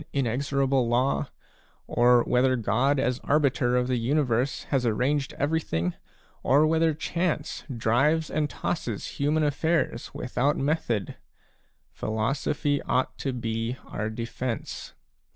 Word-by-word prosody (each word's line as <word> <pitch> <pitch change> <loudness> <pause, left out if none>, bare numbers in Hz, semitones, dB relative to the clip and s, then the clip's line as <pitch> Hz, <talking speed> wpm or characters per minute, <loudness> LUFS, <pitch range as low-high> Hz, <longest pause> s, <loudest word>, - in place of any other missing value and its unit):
inexorable 135 0 +1
law, 125 +3 +1 0.6
or 120 0 +4
whether 130 +1 +3
God 125 +5 +1
as 125 0 0
arbiter 140 -4 +2
of 125 0 +2
the 130 -1 +1
universe 130 0 0
has 135 -3 +1
arranged 135 +5 0
everything, 135 - 0 0.5
or 145 +4 +4
whether 160 0 +2
Chance 165 -1 -2
drives 135 +7 +1
and 150 -1 0
tosses 120 - -3
human 150 +2 +2
affairs 150 -3 0
without 135 +4 0
method, 135 - -1 0.7
philosophy 135 +6 -1
ought 130 0 0
to 135 - -1
be 115 0 -3
our 110 +1 -3
defence. 115 +1 -5
130 Hz, 115 wpm, -26 LUFS, 120-145 Hz, 0.7 s, or